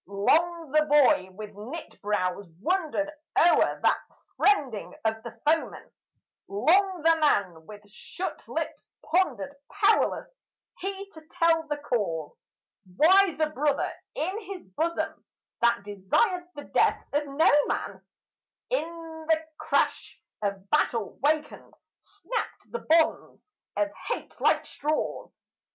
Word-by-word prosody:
Long 320 - +1
the 305 +1 +4
boy 280 -10 +4
with 210 +2 -9
knit 245 +11 -9
brows 200 -2 -1
wondered 315 - 0 0.3
o'er 345 - +4
that - - +4 0.4
friending 285 - +1
of 220 0 0
the 230 0 -10
foeman; 320 +2 0 0.6
Long 345 - +2
the 330 0 +5
man 175 - +1
with 205 -1 -12
shut 360 - -7
lips - - -4 0.2
pondered; 290 - 0 0.2
powerless - - +2 0.5
he 390 +1 -4
to 315 - -13
tell 325 -1 +2
the 295 -1 -2
cause 200 - -2 0.6
Why 375 +2 +6
the 310 -1 +1
brother 290 0 0 0.2
in 375 +7 -2
his 390 -2 -8
bosom 315 - -2 0.4
that 235 -3 +3
desired 210 - 0
the 290 - -7
death - - +1
of 290 0 0
no 280 +4 +4 0.2
man, - - -3 0.7
In 325 -6 -4
the 320 0 +2
crash - - 0 0.2
of 200 -1 -3
battle 230 -8 +1
wakened, 300 +2 -1 0.2
snapped 410 +4 -6
the 475 - -3
bonds 325 -4 +1 0.3
of 305 0 +1 0.2
hate - - -5
like - - +3
straws. 305 +2 -3
305 Hz, 120 wpm, -27 LUFS, 215-335 Hz, 0.7 s, Why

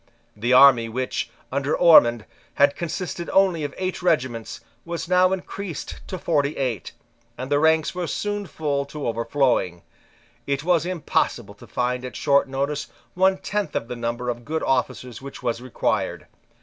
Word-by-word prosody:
The 115 +4 -1
army, 125 -3 +7
which, 130 +3 -3 0.2
under 140 +2 0
Ormond, 120 -10 +6 0.3
had 140 0 +4
consisted 170 0 -4
of - - -6
only 185 -5 +3
eight 185 0 -3
regiments, 130 -10 -1 0.2
was 170 -1 -5
now 180 +1 +4
increased 190 -2 -5
to 185 - -5
forty 150 -4 0
eight: 125 -8 -3 0.4
and 130 +2 -6
the 145 - +4
ranks 160 +1 +3
were 180 -1 -3
soon 205 +1 -3
full 145 -2 -2
to 145 +1 -6
overflowing. 115 -6 0 0.6
It 140 0 -1
was 175 0 +2
impossible 180 -5 -1
to - - -15
find 125 0 -1
at 125 - -7
short 140 -1 +2
notice 140 +2 -2 0.3
one 190 +1 +3
tenth 195 -3 -3
of 115 - -2
the 125 - -4
number 120 +1 -3
of 120 0 -4
good 160 +5 -3
officers 125 -2 -1
which 135 -1 -9
was 120 -1 -1
required. 130 -1 -2
140 Hz, 160 wpm, -23 LUFS, 125-170 Hz, 0.6 s, army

